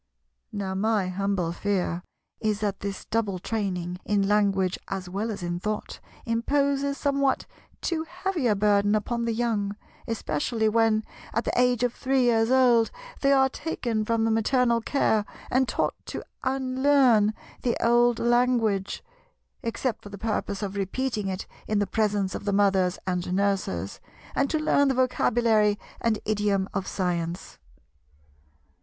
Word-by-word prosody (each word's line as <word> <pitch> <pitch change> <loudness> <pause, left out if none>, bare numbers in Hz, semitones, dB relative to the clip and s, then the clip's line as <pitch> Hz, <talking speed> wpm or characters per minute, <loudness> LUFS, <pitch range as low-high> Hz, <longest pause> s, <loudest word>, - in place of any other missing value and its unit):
Now 200 -3 -3
my 205 -1 +1
humble 190 -2 -1
fear 180 -2 -1 0.4
is 215 -2 0
that 200 -2 -1
this 200 -1 -5
double 215 -4 -1
training, 180 -3 -3
in 200 -1 +1
language 195 -3 +2
as 190 -2 -4
well 200 +5 -3
as 200 -4 -5
in 175 0 -2
thought, 210 +3 -4 0.3
imposes 280 +4 +1
somewhat 280 -1 +1 0.4
too 325 -2 -1
heavy 360 -6 -1
a 210 - +3
burden 205 0 +3
upon 235 +2 -1
the 230 - 0
young, 220 -3 -1 0.3
especially 220 +1 -1
when, 220 0 +3 0.3
at 230 - +1
the - - -2
age 250 -1 +3
of 245 -1 +1
three 265 0 +1
years 225 -2 +3
old, 245 -3 +5 0.3
they 275 - +3
are 265 -1 +5
taken 245 -6 -2
from 230 +1 +1
the 225 - +2
maternal 235 +1 +2
care 220 -4 +1 0.3
and 260 0 +3
taught - - 0
to - - -5 0.2
unlearn 260 -4 +3 0.3
the 240 - 0
old 240 0 +4
language—except 240 - -1
for 205 - -10
the 200 - -8
purpose 205 -1 -2
of 200 0 -4
repeating 210 +2 -2
it 190 0 -3 0.2
in 215 - +1
the 205 - +2
presence 205 -1 0
of - - -6
the 200 - 0
Mothers 195 -2 +3
and 180 -1 -2
Nurses—and 200 +7 -2
to 315 - +1
learn 295 -2 +3
the 265 - +1
vocabulary 230 -4 +2 0.2
and 230 -2 +1
idiom 205 -2 +1
of 195 -2 -2
science. 175 -1 -3
215 Hz, 145 wpm, -26 LUFS, 200-245 Hz, 0.4 s, old